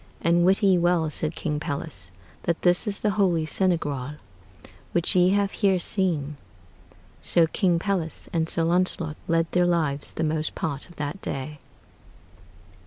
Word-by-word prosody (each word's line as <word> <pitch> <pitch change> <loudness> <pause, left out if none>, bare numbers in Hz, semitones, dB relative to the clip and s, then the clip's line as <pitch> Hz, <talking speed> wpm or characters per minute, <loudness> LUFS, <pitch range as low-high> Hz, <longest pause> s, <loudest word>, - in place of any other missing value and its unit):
And 170 0 +2
wit 195 +3 +3
ye 190 -3 +5
well," 170 -2 +2
said 155 +1 -1
King 150 -2 -2
Pelles, 95 - -4 0.4
"that 170 -1 -1
this 180 +5 +4
is 200 -1 -2
the 210 - +1
holy 170 -5 +2
sanegreall 150 -6 0 0.8
which 175 +1 +1
ye 180 0 +5
have 200 0 +1
heere 195 -3 +2
seene." 165 -6 -1 0.8
So 170 -2 +4
King 175 +1 +1
Pelles 175 -3 -2
and 165 -1 0
Sir 165 - +3
Launcelot 170 -2 0
led 165 0 +1
their 180 0 +3
lives 155 -5 -1
the 160 - -2
most 155 0 -1
part 145 +2 -3
of 175 - -15
that 150 +6 -5
day. 140 +2 -5
170 Hz, 155 wpm, -25 LUFS, 155-180 Hz, 0.8 s, ye